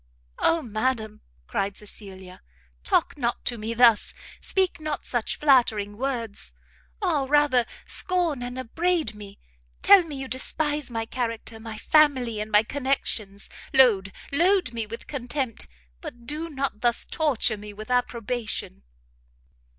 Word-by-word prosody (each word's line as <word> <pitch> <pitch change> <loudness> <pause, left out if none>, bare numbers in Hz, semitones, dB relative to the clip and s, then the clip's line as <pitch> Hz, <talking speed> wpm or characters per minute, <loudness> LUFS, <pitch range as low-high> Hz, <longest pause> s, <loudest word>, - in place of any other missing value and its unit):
"Oh 330 -1 +3
madam," 220 -1 -2 0.2
cried 195 - -2
Cecilia, 190 -3 -10 0.4
"talk 185 - +1
not 235 -2 -1
to 245 - -1
me 225 +1 -4
thus! 235 -3 +5 0.2
speak 375 -3 0
not 305 -2 -4
such 240 -3 -1
flattering 230 -8 +3
words! 235 -4 -3 0.5
ah, 305 -8 +1
rather 285 -5 +4 0.2
scorn 350 -7 0
and 245 +1 -5
upbraid 320 +1 0
me, 205 -1 -11 0.5
tell 400 - +9
me 320 -4 -7
you 270 -1 -5
despise 295 +3 -1
my 225 -1 -3
character, 230 -2 -4
my 220 -1 -7
family 260 -6 +3
and 210 +1 -4
my 210 0 +5
connections, 225 -6 -2 0.3
load, 210 -7 +5 0.2
load 350 -2 +3
me 225 -2 -3
with 230 +2 -7
contempt, 255 - -4 0.3
but 240 -1 -9
do 305 +5 -3
not 275 -7 -3
thus 240 -1 +2
torture 285 -8 +1
me 210 0 -9
with 215 +3 -8
approbation!" 235 - -2
245 Hz, 135 wpm, -25 LUFS, 215-285 Hz, 0.5 s, tell